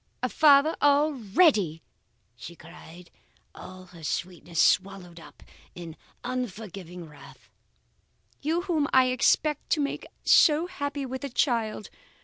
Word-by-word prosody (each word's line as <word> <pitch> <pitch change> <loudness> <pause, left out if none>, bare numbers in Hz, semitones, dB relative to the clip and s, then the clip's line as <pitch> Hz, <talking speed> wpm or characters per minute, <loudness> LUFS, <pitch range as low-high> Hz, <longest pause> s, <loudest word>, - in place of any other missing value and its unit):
A - - 0
father 300 0 +4
already!' 275 - +2 0.5
she 170 +8 -11
cried, 170 +1 -15 0.4
all 185 0 -12
her 175 -3 -16
sweetness 175 +1 -5
swallowed 185 -2 0
up - - -16 0.3
in 170 -3 -9 0.3
ungovernable 195 -8 -7
wrath. 140 -3 -17 0.9
'You 320 +4 -1
whom 320 -6 -1
I 260 -1 +4
expected 295 +4 0
to - - -6
make 285 - -4 0.2
so 310 +2 +4
happy 285 -6 -5
with 260 +1 -7
a 280 - -4
child? 230 -5 -2
220 Hz, 120 wpm, -26 LUFS, 175-285 Hz, 0.9 s, father